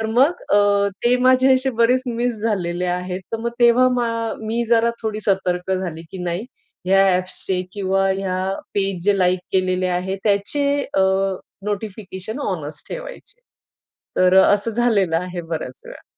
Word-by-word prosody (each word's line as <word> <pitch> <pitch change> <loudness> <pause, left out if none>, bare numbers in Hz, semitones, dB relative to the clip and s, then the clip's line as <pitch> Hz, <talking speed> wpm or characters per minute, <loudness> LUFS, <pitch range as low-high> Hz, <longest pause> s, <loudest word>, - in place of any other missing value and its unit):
तर 220 - -1
मग 265 +10 +2
अ, 205 0 +3 0.2
ते 245 +1 +4
माझे 255 +1 +5
असे 260 +1 +1
बरेच 250 +2 +4
मिस 240 0 -1
झालेले 180 -5 -1
आहेत. 180 +1 -3
तर - - 0
मग 235 +1 -2
तेव्हा 240 +2 +5
मा 240 -1 0 0.3
मी 225 +2 -2
जरा 235 0 +4
थोडी 215 -1 -3
सतर्क 190 -2 0
झाली, 175 -4 -3
की 190 - -7
नाही, 175 +5 -2 0.4
ह्या 195 +1 +5
ॲप्सचे 185 0 -2
किंवा 195 -1 +1
या 185 -2 -2 0.4
पेज 195 -3 -1
जे 205 -1 +3
लाईक 180 0 +3
केलेले 185 -1 +1
आहेत 185 +2 -2
त्याचे 205 +8 +1 0.3
अ, - - +3 0.6
नोटिफिकेशन 205 +1 -5
ऑनच 155 - -3
ठेवायचे. - - -9 0.8
तर 185 0 +4
असं 205 +3 +2
झालेलं 210 -7 +2
आहे 180 0 -4
बऱ्याच 160 -6 -6
वेळा. - - -11
200 Hz, 150 wpm, -21 LUFS, 185-230 Hz, 0.8 s, माझे